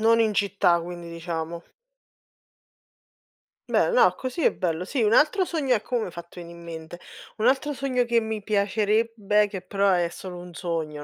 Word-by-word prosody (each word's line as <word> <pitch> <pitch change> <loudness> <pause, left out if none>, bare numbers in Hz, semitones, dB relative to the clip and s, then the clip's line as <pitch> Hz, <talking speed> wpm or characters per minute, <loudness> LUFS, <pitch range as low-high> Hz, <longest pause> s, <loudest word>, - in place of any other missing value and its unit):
Non 230 +1 +4
in 220 -2 +2
città 195 -4 +2
quindi, 175 0 -7
diciamo. 170 0 -5 2.1
Bello. - - +2
No, - - +5
così 260 +6 -4
è - - +5
bello. 175 -2 -2
Sì, 245 +4 -1
un 215 +1 +3
altro 340 - +4
sogno 290 -8 +1
ecco, 220 +3 -5
mo' 240 - +2
mi - - -2
hai - - -8
fatto 170 +1 -10
veni' 170 0 -9
in 170 0 -12
mente, 165 +1 -8 0.4
un 215 - -1
altro 275 +3 +2
sogno 260 -2 0
che 235 0 +3
mi 220 -1 -4
piacerebbe 210 +1 +1
che 195 -2 -6
però 200 +1 +1
è 175 -2 +2
solo 180 +1 -8
un 175 0 -10
sogno 160 -4 -3
200 Hz, 185 wpm, -25 LUFS, 170-230 Hz, 2.1 s, No